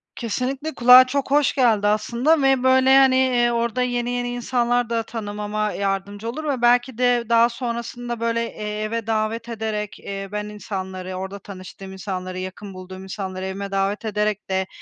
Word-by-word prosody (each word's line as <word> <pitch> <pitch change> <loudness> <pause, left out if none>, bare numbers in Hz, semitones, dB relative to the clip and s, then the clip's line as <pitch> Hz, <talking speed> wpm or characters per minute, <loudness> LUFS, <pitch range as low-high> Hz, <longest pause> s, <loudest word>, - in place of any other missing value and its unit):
Kesinlikle 260 +7 -3
kulağa 250 +1 +8
çok 275 +1 -2
hoş 290 -2 +3
geldi 225 -6 +3
aslında 240 +9 +2
ve 270 -2 +3
böyle, 260 +1 +5
hani, 265 -1 +6
eee, 245 -2 +3
orada 235 +1 0
yeni, 245 -1 -1
yeni 245 0 -2
insanlar 245 0 0
da 230 -1 0
tanımama 210 -1 -3
yardımcı 200 +2 -3
olur 310 +7 -5
ve 275 -5 -2
belki 245 0 +3
de 245 -1 +2
daha 235 0 +5
sonrasında 235 0 -5
böyle, 230 0 0
eee, 210 -1 -5
eve 225 +1 -3
davet 225 +2 -1
ederek, 215 -2 -4
eee, 195 0 -6
ben 210 0 -3
insanları, 190 -3 -6
orada 190 +2 -6
tanıştığım 190 0 -10
insanları, 185 -1 -5
yakın 190 +2 -7
bulduğum 185 0 -9
insanları 190 -1 -5
evime 195 +1 -5
davet 195 +3 -1
ederek 210 -1 -1
de 190 0 0
225 Hz, 165 wpm, -22 LUFS, 200-245 Hz, -, kulağa